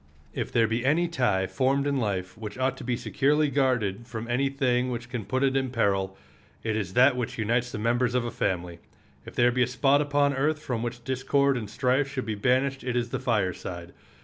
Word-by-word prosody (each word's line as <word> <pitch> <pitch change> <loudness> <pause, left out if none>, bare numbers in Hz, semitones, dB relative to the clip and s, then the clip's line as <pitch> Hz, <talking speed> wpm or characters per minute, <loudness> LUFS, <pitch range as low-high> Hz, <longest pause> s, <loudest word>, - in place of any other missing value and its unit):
If - - -3
there 115 -1 +3
be 115 +2 -1
any 155 +6 +2
tie 125 - +1
formed 135 +6 +1
in 140 -1 +1
life 95 -6 -2
which 110 0 -7
ought 130 0 0
to - - -8
be 120 -1 -1
securely 150 +2 +1
guarded 120 -6 0
from 115 -1 -6
any 130 +3 +1
thing 130 -2 +1
which 120 0 -5
can 120 -6 -4
put 130 +6 -1
it 135 -1 +2
in 135 -1 +1
peril 95 -5 0 0.5
it 110 -1 -1
is 100 -4 -3
that 130 +2 +5
which 125 -2 -3
unites 120 +2 0
the - - -4
members 120 +3 +1
of 125 -1 +1
a 120 - -3
family. 90 -6 -2 0.5
If - - -10
there 120 0 +4
be 125 +1 0
a 120 - +4
spot 135 +3 +3
upon 145 -1 +2
earth 150 +3 +1
from 125 -7 -3
which 120 0 -5
discord 135 +2 +1
and 110 -5 -4
strife 130 +4 +1
should 135 -2 -4
be 110 - -2
banished 130 +5 +1
it 125 -1 -2
is 120 -1 0
the - - -3
fireside. 90 -5 -2
125 Hz, 220 wpm, -27 LUFS, 110-135 Hz, 0.5 s, that